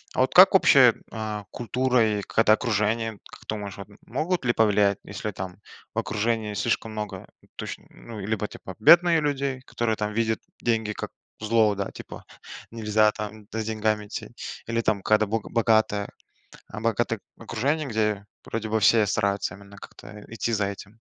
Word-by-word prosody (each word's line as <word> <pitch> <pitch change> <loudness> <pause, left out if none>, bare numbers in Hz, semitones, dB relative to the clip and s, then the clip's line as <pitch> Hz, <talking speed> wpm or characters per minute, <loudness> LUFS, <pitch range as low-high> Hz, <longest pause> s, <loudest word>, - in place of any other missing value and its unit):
А - - -2
вот - - +1
как - - +8
общая, - - +7 0.2
э, 110 -2 -4
культура 120 -3 +1
и - - -3
какая-то 110 +1 +3
окружение, 110 -1 0
как - - -13
думаешь 100 -3 -5
вот, 100 0 -8 0.2
могут 155 +6 -2
ли 120 - +2
повлиять? 105 -3 +3
Если 105 - -5
там 95 -1 -7 0.4
в - - 0
окружении 110 0 -1
слишком 115 0 -1
много, 105 -1 -6 0.3
точно, - - -7
ну, 115 -2 -11
э, 95 - -5
либо, 105 0 -1
типа, 95 - -10
бедные 170 +6 +6
людей, 140 -3 -1
которые 120 -3 -2
там 105 0 -3
видят 110 0 0 0.2
деньги 110 -2 0
как - - -6 0.3
зло, 110 -1 +3
да, 100 0 -3
типа, - - -10 0.5
нельзя 110 -1 +2
там 105 0 -7
за 110 0 -2
деньгами 110 -1 -1
идти, - - -6 0.4
или 115 0 0
там 110 -3 0
когда 110 0 +3
бога 110 +1 -3
богатое 110 -3 +2 0.6
э, 105 - -5
богатое 115 0 0 0.2
окружение, 135 +7 -1
где 105 -3 -1 0.2
вроде 115 -1 -4
бы 110 +1 +1
все 110 +1 +5
стараются 100 0 0
именно 100 0 -15
как-то, - - -13
э, 105 0 -11
идти 115 +1 -3
за 105 -2 +1
этим. 100 +2 -9
110 Hz, 170 wpm, -25 LUFS, 105-115 Hz, 0.6 s, как